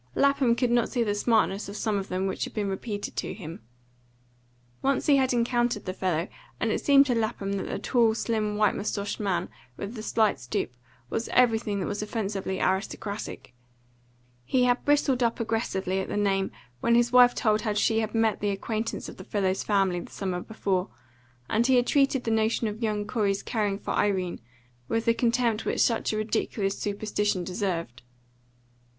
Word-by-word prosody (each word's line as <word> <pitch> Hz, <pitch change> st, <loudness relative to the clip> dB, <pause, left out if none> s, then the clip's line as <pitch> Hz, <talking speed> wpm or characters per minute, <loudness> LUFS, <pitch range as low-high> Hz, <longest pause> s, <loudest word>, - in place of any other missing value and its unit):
Lapham 280 Hz, -4 st, +3 dB
could 245 Hz, 0 st, +1 dB
not 240 Hz, -1 st, +2 dB
see 245 Hz, -3 st, 0 dB
the 205 Hz, -2 st, 0 dB
smartness 205 Hz, -2 st, +1 dB
of 200 Hz, -, -7 dB
some 210 Hz, -2 st, 0 dB
of 195 Hz, -, -5 dB
them 185 Hz, +1 st, -2 dB
which 190 Hz, -, -2 dB
had -, -, -10 dB
been 210 Hz, -2 st, -1 dB
repeated 205 Hz, +1 st, -4 dB
to -, -, -3 dB
him. 165 Hz, -, -8 dB, 1.2 s
Once 275 Hz, 0 st, +1 dB
he 285 Hz, -2 st, +5 dB
had 260 Hz, -1 st, +2 dB
encountered 240 Hz, -2 st, +1 dB
the 185 Hz, -, -3 dB
fellow, 180 Hz, -2 st, -1 dB, 0.3 s
and -, -, 0 dB
it -, -, -1 dB
seemed 280 Hz, -1 st, +6 dB
to 255 Hz, -, +1 dB
Lapham 220 Hz, -3 st, -1 dB
that 195 Hz, -, -3 dB
the -, -, -3 dB
tall, 230 Hz, -3 st, +2 dB
slim, 215 Hz, -2 st, -1 dB
white 210 Hz, -2 st, +3 dB
moustached 200 Hz, 0 st, -3 dB
man, 185 Hz, -4 st, 0 dB, 0.3 s
with 200 Hz, +3 st, -5 dB
the 220 Hz, -, -6 dB
slight 215 Hz, -7 st, +1 dB
stoop, 120 Hz, 0 st, -3 dB, 0.4 s
was 225 Hz, -, -2 dB
everything 225 Hz, -4 st, +2 dB
that -, -, -2 dB
was 205 Hz, 0 st, -3 dB
offensively 200 Hz, -3 st, -3 dB
aristocratic. 200 Hz, -, -3 dB, 0.9 s
He 250 Hz, -, +2 dB
had 245 Hz, 0 st, +2 dB
bristled 285 Hz, -3 st, +3 dB
up 235 Hz, -1 st, +1 dB
aggressively 195 Hz, -5 st, -1 dB
at 190 Hz, -, -3 dB
the -, -, -3 dB
name 195 Hz, -2 st, +1 dB, 0.3 s
when 235 Hz, -, +3 dB
his 240 Hz, 0 st, +3 dB
wife 250 Hz, -1 st, +7 dB
told 215 Hz, -2 st, +2 dB
how 215 Hz, -2 st, -1 dB
she 220 Hz, +2 st, +2 dB
had 220 Hz, 0 st, -2 dB
made 225 Hz, -1 st, +2 dB
the 205 Hz, -, 0 dB
acquaintance 220 Hz, +3 st, -3 dB
of -, -, -10 dB
the -, -, -9 dB
fellow's 190 Hz, -2 st, 0 dB
family 195 Hz, -4 st, +1 dB
the -, -, -9 dB
summer 185 Hz, -3 st, -3 dB
before, 195 Hz, -3 st, -2 dB, 0.6 s
and 230 Hz, +3 st, +2 dB
he 260 Hz, -, +5 dB
had 245 Hz, -1 st, +4 dB
treated 275 Hz, -1 st, +2 dB
the 225 Hz, -, -1 dB
notion 220 Hz, +1 st, +1 dB
of 215 Hz, +2 st, -5 dB
young 210 Hz, -2 st, -1 dB
Corey's 205 Hz, -3 st, 0 dB
caring 210 Hz, -4 st, -1 dB
for -, -, -5 dB
Irene 185 Hz, -4 st, 0 dB, 0.5 s
with 225 Hz, +7 st, -1 dB
the 230 Hz, -, +4 dB
contempt 230 Hz, -2 st, +1 dB
which -, -, -1 dB
such 230 Hz, -2 st, +2 dB
a 215 Hz, -, -2 dB
ridiculous 210 Hz, -2 st, -1 dB
superstition 205 Hz, -2 st, -1 dB
deserved. 175 Hz, -8 st, -3 dB
215 Hz, 185 wpm, -27 LUFS, 195-235 Hz, 1.2 s, wife